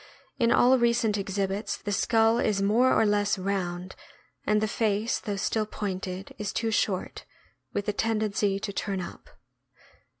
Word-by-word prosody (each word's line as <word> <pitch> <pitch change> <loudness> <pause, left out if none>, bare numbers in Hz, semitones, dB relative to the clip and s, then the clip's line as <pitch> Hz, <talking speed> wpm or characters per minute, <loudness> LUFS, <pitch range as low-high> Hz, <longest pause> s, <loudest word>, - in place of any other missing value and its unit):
In 235 -1 +3
all 250 +2 +5
recent 235 -3 +2
exhibits 195 +1 -2
the 205 - -5
skull 225 +2 +3
is 210 -4 +1
more 220 +6 +3
or 220 - +4
less 205 0 +2
round, 185 -2 -3 0.5
and 210 0 +3
the 215 - 0
face, 215 0 0
though 205 -3 -4
still 215 +2 -1
pointed, 190 -2 -5
is 210 -1 -2
too 225 -1 -1
short, 195 -3 -1 0.5
with 205 - -3
a 210 - +1
tendency 210 -2 0
to 200 - -4
turn 195 -1 -2
up. 180 - -8
205 Hz, 155 wpm, -27 LUFS, 195-225 Hz, 0.5 s, all